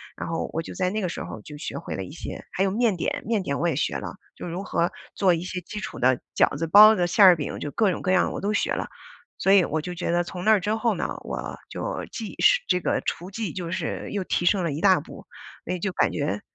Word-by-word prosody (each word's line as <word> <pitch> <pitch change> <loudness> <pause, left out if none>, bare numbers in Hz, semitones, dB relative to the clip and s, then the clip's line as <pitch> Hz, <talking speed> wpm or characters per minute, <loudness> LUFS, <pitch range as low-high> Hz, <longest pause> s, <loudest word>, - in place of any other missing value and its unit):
然 - - -5
后 165 - -2
我 165 - -1
就 - - -9
在 185 -1 0
那 215 +2 -2
个 180 - -1
时 - - -5
候 110 - -8
就 150 +6 -10
学 - - -6
会 - - -6
了 95 - -4
一 95 - -9
些。 165 - -7
还 190 - 0
有 195 - +2
面 220 +1 +1
点， 175 - -2
面 220 -2 +1
点 140 -6 -2
我 175 - +1
也 165 - 0
学 145 - -1
了， - - -6 0.2
就 - - -7
如 175 +3 -4
何 170 -3 0 0.2
做 190 -3 +4
一 165 - -1
些 180 +1 -4
基 210 +5 -7
础 - - -6
的 130 0 +3 0.2
饺 - - +3
子、 165 +3 -2
包 210 +6 +9
子、 175 -3 +1
馅 195 +3 +6
儿 180 -2 +9
饼， 145 - -4
就 145 - -4
各 215 -4 +2
种 - - -5
各 185 - +1
样 185 - +3
我 - - -4
都 205 +2 -1
学 - - 0
了。 - - -2 0.5
所 195 - +3
以 195 -2 +7
我 155 +1 -2
就 180 +3 -6
觉 170 -1 -2
得 175 0 +2
从 180 +1 -7
那 220 - +6
儿 215 - +5
之 210 +3 -1
后 230 +1 +1
呢， - - -2 0.2
我 - - -5
就 - - -4
技 220 -3 -6
是 - - +5
这 180 - +2
个 - - 0
厨 180 +3 -4
技 210 -3 -3
就 170 -1 -5
是 180 -4 -3
又 200 -2 -2
提 175 - -1
升 185 +1 +3
了 165 - -1
一 150 - -4
大 190 -2 +5
步， - - -12 0.4
所 - - -2
以 180 - -3
就 190 +2 -1
感 - - +2
觉， 105 -9 -2
180 Hz, 305 characters per minute, -25 LUFS, 165-200 Hz, 0.5 s, 包